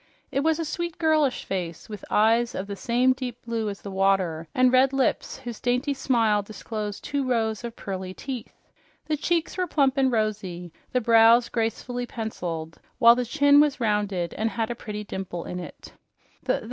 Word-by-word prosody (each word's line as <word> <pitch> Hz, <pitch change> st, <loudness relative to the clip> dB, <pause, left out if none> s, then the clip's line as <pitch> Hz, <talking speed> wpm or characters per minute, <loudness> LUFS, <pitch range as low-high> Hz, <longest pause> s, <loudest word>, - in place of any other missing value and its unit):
It -, -, 0 dB
was 315 Hz, +2 st, +2 dB
a 330 Hz, -, -2 dB
sweet, 345 Hz, +1 st, -4 dB
girlish 310 Hz, -5 st, +2 dB
face 175 Hz, -4 st, -4 dB
with 210 Hz, -3 st, -8 dB
eyes 230 Hz, +3 st, +3 dB
of 190 Hz, -, -3 dB
the 200 Hz, 0 st, -6 dB
same 245 Hz, +4 st, +2 dB
deep 250 Hz, -2 st, -6 dB
blue 225 Hz, -2 st, -2 dB
as 200 Hz, -, -8 dB
the 200 Hz, -, -6 dB
water 190 Hz, -4 st, +1 dB
and 255 Hz, 0 st, +4 dB
red 260 Hz, +1 st, +5 dB
lips 270 Hz, -1 st, 0 dB
whose 240 Hz, -4 st, -7 dB
dainty 250 Hz, +4 st, 0 dB
smile 230 Hz, -6 st, +2 dB
disposed 210 Hz, 0 st, -6 dB
two 285 Hz, -1 st, -1 dB
rows 225 Hz, -3 st, 0 dB
of 235 Hz, -1 st, -6 dB
pearly 190 Hz, -2 st, -5 dB
teeth. 255 Hz, -1 st, -7 dB, 0.4 s
The 310 Hz, -, 0 dB
cheeks 335 Hz, +3 st, -1 dB
were 365 Hz, -1 st, 0 dB
plump 275 Hz, -4 st, +2 dB
and 265 Hz, -1 st, +3 dB
rosy, 200 Hz, -6 st, -2 dB, 0.2 s
the 250 Hz, -, +1 dB
brows 230 Hz, +1 st, +6 dB
gracefully 245 Hz, +2 st, -2 dB
penciled, 170 Hz, -9 st, -5 dB, 0.2 s
while 235 Hz, -2 st, +8 dB
the 250 Hz, +1 st, -1 dB
chin 285 Hz, +3 st, +5 dB
was 290 Hz, -2 st, +3 dB
rounded 205 Hz, -6 st, 0 dB
and 220 Hz, +1 st, -1 dB
had 225 Hz, 0 st, -2 dB
a -, -, -3 dB
pretty 210 Hz, -2 st, -6 dB
dimple 190 Hz, -4 st, -5 dB
in 180 Hz, -, -5 dB
it. 175 Hz, -, -10 dB
230 Hz, 180 wpm, -25 LUFS, 205-260 Hz, 0.4 s, while